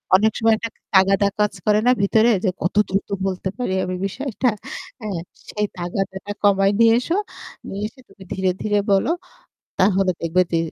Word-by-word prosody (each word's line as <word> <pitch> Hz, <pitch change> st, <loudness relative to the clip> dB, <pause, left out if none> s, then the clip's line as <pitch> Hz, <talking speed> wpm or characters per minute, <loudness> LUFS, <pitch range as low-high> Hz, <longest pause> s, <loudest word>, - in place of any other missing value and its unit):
অনেক 215 Hz, +3 st, +4 dB
সময় 225 Hz, 0 st, +4 dB
একটা 230 Hz, -, -4 dB, 0.3 s
তাগাদা 195 Hz, +1 st, +5 dB
কাজ 210 Hz, -1 st, +2 dB
করে 210 Hz, 0 st, +4 dB
না -, -, +7 dB
ভিতরে? 220 Hz, +4 st, +4 dB
যে 195 Hz, -, +3 dB
কত 180 Hz, -, -1 dB
দ্রুত 195 Hz, +1 st, -1 dB, 0.2 s
বলতে 190 Hz, 0 st, -3 dB
পারি 245 Hz, -7 st, -2 dB
আমি 185 Hz, 0 st, -3 dB
বিষয়টা। 255 Hz, +3 st, -1 dB, 0.5 s
হ্যা? 215 Hz, -, -6 dB, 0.4 s
সেই 210 Hz, 0 st, -1 dB
তাগাদাটা 190 Hz, +3 st, -4 dB
কমায় 195 Hz, 0 st, +4 dB
নিয়ে 230 Hz, 0 st, +6 dB
এসো। 330 Hz, +8 st, -1 dB, 0.5 s
নিয়ে 200 Hz, +1 st, -4 dB
এসে 250 Hz, +4 st, -18 dB
তুমি 195 Hz, 0 st, -15 dB
ধীরে, 190 Hz, 0 st, 0 dB
ধীরে 210 Hz, -1 st, +1 dB
বলো, 195 Hz, +9 st, +3 dB, 0.7 s
তাহলে 190 Hz, 0 st, +3 dB
দেখবে 170 Hz, +2 st, +2 dB
যে 165 Hz, -, +3 dB
200 Hz, 170 wpm, -21 LUFS, 190-220 Hz, 0.7 s, না